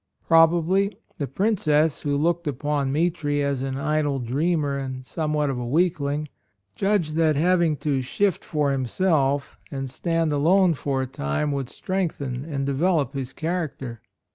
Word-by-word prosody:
Probably 170 +5 +4 0.2
the 140 - -1
Princess, 160 - +1
who 145 -1 -1
looked 170 +2 0
upon 145 0 -1
Mitri 150 -2 0
as 140 -2 -1
an 135 0 -3
idle 150 -1 0
dreamer 145 +4 0
and 130 -1 -5
somewhat 150 -1 -1
of 125 - -3
a 120 - -4
weakling, 150 -1 0 0.5
judged 195 -6 0
that 160 -2 +3
having 170 0 +2
to 140 -3 +1
"shift 190 +9 0
for 150 -3 0
him 130 -2 -1
self" 145 -4 +1
and 135 -1 -4
stand 165 +4 -1
alone 175 +5 +4
for 135 -2 -1
a - - -2
time 125 - -2
would 135 -3 -3
strengthen 155 - -3
and 140 -4 -3
develop 145 0 +1
his 135 -2 -4
character. 155 - -4
150 Hz, 150 wpm, -24 LUFS, 135-165 Hz, 0.5 s, Probably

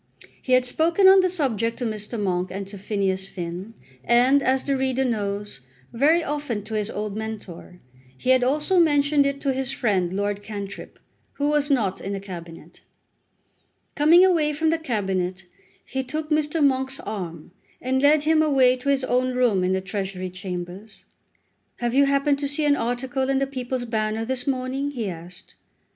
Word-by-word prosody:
He 255 - -1
had 255 0 +4
spoken 330 +9 +3
on 385 0 +8
the 370 -1 +3
subject 230 - -1
to 250 - -3
Mr. 215 +1 -4
Monk 185 -2 -1
and 195 +1 -5
to 200 - -8
Phineas 195 -2 -1
Finn, 180 +5 -7 0.3
and, 250 +4 +4
as 265 0 +1
the 275 - 0
reader 265 0 0
knows, 205 - -3 0.3
very 305 +8 +3
often 290 -8 -3
to 220 +1 -8
his 210 -1 -1
old 210 -1 -4
mentor. 215 -5 -7 0.4
He 255 - +1
had 260 -1 +4
also 300 +8 +2
mentioned 290 -3 +3
it 280 0 -3
to 275 -2 0
his 265 0 -1
friend 195 -9 0
Lord 205 +1 -2
Cantrip, 205 -1 -8 0.4
who 290 +1 -1
was 295 -1 +1
not 215 -9 +1
in 195 - -4
the 195 - -3
Cabinet. 170 -4 -10 1.1
Coming 330 +5 +6
away 320 -5 +2
from 315 +2 +1
the 325 - 0
Cabinet 190 - -2 0.4
he 265 0 -3
took 305 +4 -5
Mr. 305 0 +2
Monk's 265 0 0
arm, 175 -7 -6 0.3
and 260 +1 0
led 290 +1 +4
him 310 0 +3
away 265 -4 +4
to 255 +3 -3
his 275 -1 +2
own 255 0 0
room 235 -7 +2
in 185 +1 +1
the 190 - 0
Treasury 190 -2 -4
Chambers. 185 +2 -7 0.7
"Have 240 -1 -2
you 280 +1 +5
happened 280 0 +2
to 285 - -1
see 290 +2 -1
an 290 -1 +4
article 260 +2 -2
in 270 - +2
the 275 - +1
'People's 255 -2 -4
Banner' 220 -1 -1
this 260 +2 -3
morning?" 265 +1 -1
he 240 -7 -4
asked. 175 +2 -11
250 Hz, 180 wpm, -24 LUFS, 200-280 Hz, 1.1 s, on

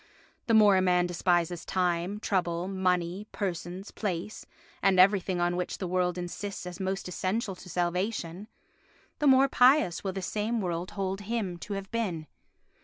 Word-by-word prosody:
The 230 - +4
more 205 -3 +7
a - - +3
man 180 -1 +3
despises 175 -1 0
time, 180 +2 -1
trouble, 175 -4 -1
money, 185 0 -1
persons, 180 0 -4
place 200 0 -4 0.3
and 195 -2 +3
everything 190 -1 +4
on 175 0 +1
which 180 0 -3
the 190 - -4
world 180 0 0
insists 180 +2 -5
as 180 0 -7
most 190 0 -2
essential 195 +3 -2
to 180 - -12
salvation, 180 +2 -2 0.7
the 295 - +2
more 265 0 +6
pious 255 - +4
will 190 -1 -2
this 190 -1 -4
same 220 +2 -1
world 175 -2 -2
hold 195 0 -2
him 205 -3 -2
to 200 +4 -6
have 195 0 -6
been. 195 -9 -2
185 Hz, 160 wpm, -29 LUFS, 175-205 Hz, 0.7 s, more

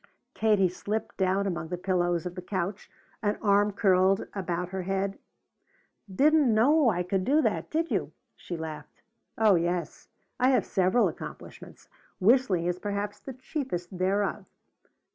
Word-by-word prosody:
Katie 210 -4 +3
slipped 205 +5 -4
down 190 +1 +1
among 170 -4 -3
the 180 +2 -4
pillows 175 -2 0
of 180 - -4
the 180 - -7
couch, 190 +2 -4 0.3
an 205 -2 0
arm 205 0 +3
curled 190 -2 +3
about 180 -2 -3
her 190 0 -4
head. 195 +1 -2 0.9
"Didn't 290 +5 +4
know 260 +6 +4
I 180 -4 0
could 185 +1 -1
do 285 +9 +3
that, - - -1
did 325 +2 -1
you?" - - -1 0.2
she 175 - -7
laughed. 155 -2 -8 0.3
"Oh 220 -2 +5
yes, 175 0 -2 0.3
I 255 +1 +4
have 260 - +3
several 190 +5 +2
accomplishments. - - -9 0.3
Whistling 205 -4 +3
is 180 0 -1
perhaps 205 +1 -3
the 270 - -8
chiefest 255 - -5
thereof. 195 +2 0
195 Hz, 145 wpm, -28 LUFS, 180-220 Hz, 0.9 s, Oh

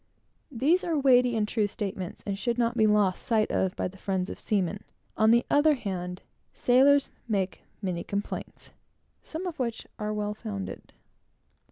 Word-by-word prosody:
These 290 +9 +2
are 330 -3 0
weighty 250 -3 +4
and 215 -1 +1
true 215 -2 +1
statements, 195 -3 -5
and 200 - -1
should 235 +1 -1
not 235 0 +1
be 220 -2 +4
lost 205 -3 +2
sight 220 -3 +1
of 190 -1 0
by - - -1
the 190 +1 -12
friends 190 -1 -2
of - - -8
seamen. 200 -1 -1 0.3
On 220 0 +4
the 235 +1 +5
other 295 +1 +4
hand, 180 -6 -5 0.3
sailors 275 +3 +4 0.2
make 195 -4 -1 0.2
many 180 -3 -2
complaints, 200 +1 -5 0.5
some 325 +4 -6
of 350 -5 -5
which 235 -3 -2
are 210 0 -2
well 210 0 -2
founded. 210 -3 -7
215 Hz, 165 wpm, -28 LUFS, 195-245 Hz, 0.5 s, the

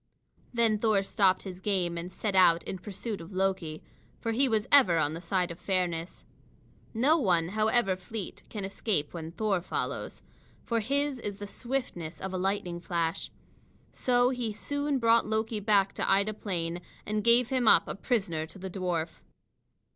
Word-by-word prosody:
Then 230 -3 +2
Thor 210 -3 +3
stopped 195 -2 +2
his 185 -2 -8
game 185 -4 0
and 170 +2 -5
set 200 +1 -3
out 170 -3 +5
in 190 - -5
pursuit 205 +1 -5
of 165 +4 -10
Loki, 185 -5 -1 0.4
for 230 - -2
he 260 +4 +3
was 220 -2 +1
ever 200 -13 +6
on 155 -1 +1
the 165 - -6
side 180 0 0
of 170 - -9
fairness. 180 -3 -2 0.7
No 280 +9 +3
one, 175 - +2
however 215 -1 +2
fleet, 190 +2 -6
can 205 -3 -4
escape 195 -6 -1
when 165 -2 -6
Thor 195 0 0
follows, - - -4 0.4
for 230 -1 +1
his 280 +4 0
is 205 -3 -4
the 205 +1 -7
swiftness 200 - -4
of 190 0 -5
a 185 - -1
lightning 185 -2 -1
flash. 170 -1 -2 0.6
So 245 0 +2
he 240 -4 -2
soon 285 +5 -1
brought 230 -2 +4
Loki 220 0 -1
back 200 -2 +3
to - - -1
Ida 200 +2 +3
Plain, 175 -4 -3 0.2
and 210 0 -1
gave 235 +1 +5
him 255 -3 +1
up - - +6
a - - -3
prisoner 190 -8 -1
to 180 - -14
the 190 0 -6
dwarf. 175 -3 -3
195 Hz, 170 wpm, -29 LUFS, 175-225 Hz, 0.7 s, ever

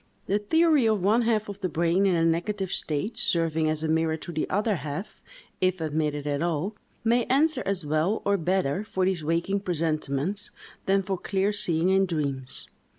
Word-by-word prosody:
The 200 +2 +1
theory 310 +3 +3
of 215 -4 +1
one 215 +5 +4
half 225 -2 +1
of 200 -1 -7
the 185 - -1
brain 170 +4 +2
in 185 - +3
a 165 0 +2
negative 185 +4 0
state, 180 +10 -1
serving 160 -2 +1
as 155 0 -1
a - - 0
mirror 160 0 +1
to 175 - -8
the 155 -2 -2
other 205 0 +1
half, 150 +7 -6 0.4
if 185 0 +2
admitted 150 -2 -1
at 145 0 -1
all, 170 +5 -1 0.3
may 235 +1 +3
answer 305 +4 +2
as 190 -5 -1
well, 155 +8 0
or 200 - +3
better, 185 -1 0
for 190 -3 -1
these 185 -4 0
waking 170 +5 0
presentiments, 165 0 -2 0.4
than 195 0 +3
for 190 -1 -3
clear 195 +2 0
seeing 175 -4 +2
in 190 0 +3
dreams. 140 -6 -3
180 Hz, 185 wpm, -26 LUFS, 160-200 Hz, 0.4 s, one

